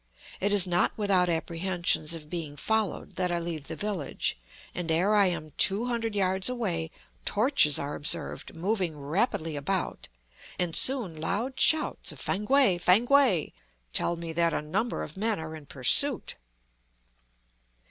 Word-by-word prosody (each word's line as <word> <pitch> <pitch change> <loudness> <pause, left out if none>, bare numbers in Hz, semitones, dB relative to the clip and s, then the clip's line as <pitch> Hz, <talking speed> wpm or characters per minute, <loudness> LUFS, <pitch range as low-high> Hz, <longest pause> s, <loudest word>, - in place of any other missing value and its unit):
It 200 +2 0
is 200 -3 +4
not 175 -1 +1
without 195 -4 +2
apprehensions 170 -1 0
of 155 -2 -10
being 155 -3 -5
followed 220 +4 -2
that 180 -1 0
I 175 - 0
leave 165 -4 -5
the - - -5
village; 200 -9 -2 0.4
and 175 -2 -4
ere 175 +6 +2
I 205 -2 +5
am 160 -4 -3
two 205 +5 +4
hundred 230 -3 -2
yards 190 +1 0
away, 185 -10 -2 0.3
torches 215 - +3
are 145 +1 -3
observed 160 +2 -3
moving 180 -2 -1
rapidly 165 - -1
about, 175 +6 -2 0.5
and 175 -2 -1
soon 250 -10 +2
loud 230 +10 -2
shouts 315 -1 +3
of - - -11
"Fankwae, 210 -2 +2
Fankwae!" 225 - +3 0.4
tell 170 - 0
me 165 -1 -6
that 170 0 +1
a - - -1
number 210 +10 -2
of - - -9
men 215 -1 0
are 160 0 -6
in 150 -3 -12
pursuit. 225 - +1
180 Hz, 145 wpm, -28 LUFS, 165-210 Hz, 0.5 s, I